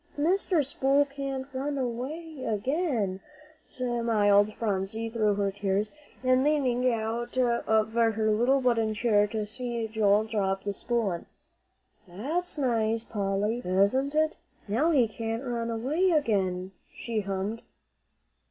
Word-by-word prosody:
"Mr. 340 0 +2
Spool 275 +1 +2
can't 275 -1 -4
run 280 +2 -2
away 270 +5 -4
again," 225 - -1 0.5
smiled 220 -4 +2
Phronsie 220 +1 -2
through 215 -3 +1
her 200 -1 0
tears, 200 +1 -1 0.3
and 255 0 +3
leaning 255 -4 +2
out 230 +2 -3
of 220 -3 +2
her 230 -1 +3 0.2
little 245 +6 +3
wooden 230 -4 +1
chair 210 -2 +3
to 215 0 -3
see 235 +1 -3
Joel 215 -1 +3
drop 195 -3 -1
the 200 - -2
spool 230 -1 -1
in. 170 - -5 0.8
"That's 295 - -3
nice, 225 -4 +1
Polly, 205 +2 -1
isn't 200 +11 +2
it? 310 +1 +2 0.3
Now 245 +11 +2
he 265 -8 +4
can't 225 +2 -4
run 235 -2 -2
away 275 +11 +1
again," 195 - +1 0.2
she 230 -2 -3
hummed. 200 +3 -3
230 Hz, 125 wpm, -28 LUFS, 210-265 Hz, 0.8 s, he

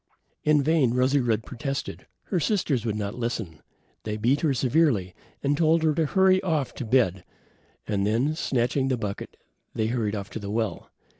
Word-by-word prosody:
In 150 -1 +4
vain 145 -6 +2
Rosy 130 +3 +3
red 115 -4 0
protested. 140 +1 -5 0.2
Her 185 - -1
sisters 150 - 0
would 105 - -1
not 100 -1 -3
listen. 115 -10 -4 0.4
They 105 0 -4
beat 125 +7 +2
her 155 - +2
severely, 125 - +2 0.4
told 160 +1 +3
her 155 -1 +3
to 160 0 +1
hurry 190 +2 +4
off 160 -8 -1
to 125 - -5
bed, 100 -7 +2 0.6
and 100 -2 -1
then, 115 +9 +1
snatching 130 -2 0
the 130 -2 +1
bucket, 105 -3 -5 0.4
they 110 - 0
hurried 110 -4 -1
off 100 -1 -6
to - - -5
the 100 -1 -6
well. 110 -4 -2
125 Hz, 170 wpm, -26 LUFS, 110-150 Hz, 0.6 s, In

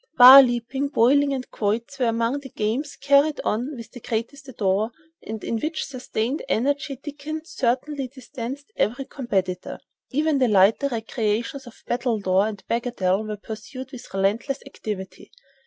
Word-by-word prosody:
Bar 255 +2 +12
leaping, 250 +2 -1
bowling 280 +2 +4
and 260 -2 -3
quoits 230 +6 -2
were 250 - +2
among 230 +4 0
the 275 -1 -10
games 245 +8 -2
carried 285 +2 +3
on 250 +7 -1
with 230 -2 -10
the 245 - -10
greatest 240 +5 -4
ardor, 205 +3 +1 0.3
and 220 -1 -7
in 230 - -1 0.2
sustained 255 -2 -3
energy 280 +4 0
Dickens 295 +4 -7
certainly 265 +3 -1
distanced 265 - -8
every 245 +6 0
competitor. 190 -10 -2 0.3
Even 300 +1 +1
the 255 - +4
lighter 210 +6 +4
recreations 230 +1 -2
of 240 - -14
battledore 215 -5 +1
and 205 -3 -9
bagatelle 220 -5 0
were 210 -1 -4
pursued 245 +5 -8
with 255 - -10
relentless 215 +8 0
activity. 210 -8 -7
245 Hz, 140 wpm, -24 LUFS, 220-275 Hz, 0.3 s, Bar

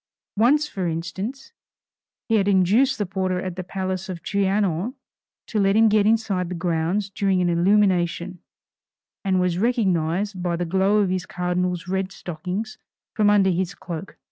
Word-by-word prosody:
Once, 280 +8 +3
for 190 -10 -3
instance, 190 - -5 0.7
he 225 - 0
had 200 -1 +1
induced 205 +8 +3
the 205 - -1
porter 185 -1 -1
at 185 -1 -4
the 185 - -5
palace 190 0 -4
of 185 - -4
the - - -24
Trianon 200 - 0 0.5
to 215 - -2
let 195 0 +3
him 220 0 +5
get 210 -1 +3
inside 210 -5 +1
the 180 - -4
grounds 175 +3 -1
during 195 -1 +1
an 180 -1 +2
illumination, 180 -1 +2 0.8
and 190 -2 +1
was 180 -1 0
recognized 195 -4 0
by 175 -1 -1
the 175 +1 -2
glow 190 +4 +2
of 190 -3 +1
his 185 -1 -2
cardinal's 180 0 -2
red 190 +1 -2
stockings 180 +5 -5 0.3
from 210 -1 +3
under 200 -2 +4
his 185 +2 -2
cloak. 175 +2 -7
190 Hz, 165 wpm, -23 LUFS, 180-205 Hz, 0.8 s, him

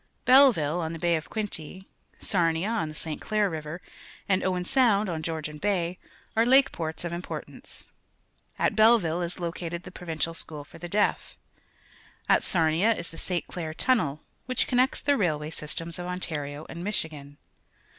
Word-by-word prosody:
Belleville, 235 - +6
on 160 0 -3
the 165 - -6
Baxj 170 0 +2
of 155 - -14
Quinte, 190 -4 -3 0.3
Sarnia. 170 0 +1
on 225 -9 -1
the 155 - -9
St. 155 0 -3
Clnir 210 -3 +1
River, 155 +2 -6 0.4
and 190 -2 +2
Oiven 180 -1 0
Soundj 215 -4 +3
on 165 -3 -3
Georgian 155 -2 -4
Bay,_are 195 +4 -1
lake 270 +2 +6
ports 160 0 -4
of 170 - -3
impor 175 +1 -5
tance. - - -13 0.7
At - - +1
B 215 - +3
elleville 195 -7 +5
is 175 +2 -4
located 170 0 -4
the 185 - -10
Provin 170 -3 -6
cial 165 +1 0
School 150 -3 -4
for 165 +3 -15
the 175 +1 -7
Deaf. 205 +3 0 0.9
At - - +5
Sarnia 170 +6 +2
is 170 - -6
t 165 - -11
he 180 -2 -1
Sjb. - - -26
Clair 160 -3 -5
tunnel, 160 - +1 0.3
wliich 255 - +2
connects 255 +1 +2
the 285 -1 +3
railway 155 -6 0
systems 165 +2 -2
of 175 - -4
Ontario 155 -5 -4
and 170 +1 -7
Michigan. 150 -8 -3
170 Hz, 175 wpm, -27 LUFS, 160-205 Hz, 0.9 s, Belleville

